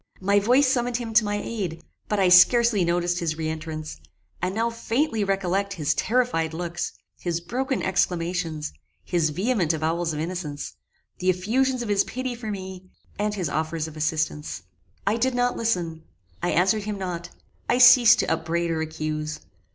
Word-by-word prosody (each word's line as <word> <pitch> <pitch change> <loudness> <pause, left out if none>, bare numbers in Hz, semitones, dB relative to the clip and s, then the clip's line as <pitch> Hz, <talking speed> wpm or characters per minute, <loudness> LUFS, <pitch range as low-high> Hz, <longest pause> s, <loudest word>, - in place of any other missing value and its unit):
My 200 +2 +3
voice 250 +7 +4
summoned 245 -2 +1
him 230 -2 -5
to 215 0 +6
my 205 0 -1
aid; 185 -8 -4 0.3
but 210 - 0
I 190 - +4
scarcely 215 +3 +6
noticed 175 +1 0
his 160 -2 -2
re 160 -1 -2
entrance, 155 - -5 0.4
and 185 +2 -1
now 230 +1 0
faintly 230 0 0
recollect 195 0 0
his 155 -6 0
terrified 215 -10 0
looks, 175 0 -3 0.3
his 170 -1 -2
broken 255 +9 -2
exclamations, 175 -3 -1 0.3
his 170 -3 +1
vehement 185 - 0
avowals 165 +2 -1
of 150 - -4
innocence, 160 -3 -4 0.5
the 185 - +1
effusions 240 +8 +1
of 225 - -6
his 200 -1 +3
pity 255 0 -4
for 230 -2 -6
me, 190 -2 -7 0.3
and 210 0 0
his 185 -5 -2
offers 160 +1 -2
of 160 - -10
assistance. 155 - -2 0.4
I 205 +3 +2
did 255 +2 +1
not 245 0 +1
listen 175 -8 -1 0.4
I 175 - 0
answered 190 +5 +2
him 210 -1 -3
not 175 -2 -5 0.4
I - - +3
ceased 245 -2 +8
to - - -1
upbraid 165 +1 -1
or 160 -1 -1
accuse. 155 -1 -4
180 Hz, 165 wpm, -25 LUFS, 165-225 Hz, 0.5 s, ceased